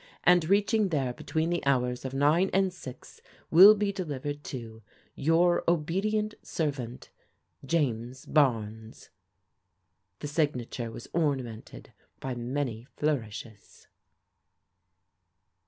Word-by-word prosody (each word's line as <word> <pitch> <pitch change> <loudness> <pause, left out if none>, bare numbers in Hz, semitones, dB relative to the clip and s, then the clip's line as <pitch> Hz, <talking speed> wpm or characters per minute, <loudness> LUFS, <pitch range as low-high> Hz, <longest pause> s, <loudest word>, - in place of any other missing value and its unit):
and 175 -2 +4
reaching 205 +1 +3
there 135 -6 -1
between 160 +6 -2
the 175 - -1
hours 125 -3 +1
of 130 - -4
9 150 +7 +3
and 190 -1 +2
6, 130 -8 -11 0.3
will 195 +6 +10
be 205 -1 0
delivered 145 -6 -5
to 115 -4 -7 0.2
" - - -35
Your 175 +1 +4
obedient 195 +7 0
servant, 135 -7 -4 0.3
" - - -43
James 125 -2 -2
Barnes." 110 -6 0 1.1
The 145 - -6
signature 130 -6 -2
was 115 - -9
ornamented 130 -9 -3 0.3
by 130 - -4
many 120 -1 -3
flourishes. 115 -7 -4
145 Hz, 105 wpm, -28 LUFS, 125-175 Hz, 1.1 s, will